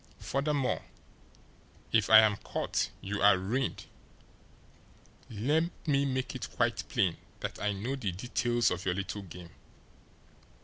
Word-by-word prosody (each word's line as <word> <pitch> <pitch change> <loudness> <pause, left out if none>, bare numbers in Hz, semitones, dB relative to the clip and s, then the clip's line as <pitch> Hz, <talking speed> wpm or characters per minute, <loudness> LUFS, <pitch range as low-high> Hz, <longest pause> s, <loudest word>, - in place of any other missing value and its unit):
Furthermore, 140 -1 -1 1.1
if 110 -3 +3
I 110 0 +10
am 105 -2 +3
caught - - -2
you 105 +1 -3
are 100 -1 +7
ruined. 120 +9 -2 1.4
Let 145 +10 +1 0.2
me 140 -3 +2
make 130 -1 -2
it - - -5
quite - - -1
plain 90 -4 +1 0.2
that - - -4
I 105 - +1
know 115 +8 -3
the 110 -8 -2
details 120 +4 0
of 90 +1 -3
your 95 -3 0
little 100 +1 -4
game. 90 -2 -11
110 Hz, 130 wpm, -30 LUFS, 95-130 Hz, 1.4 s, I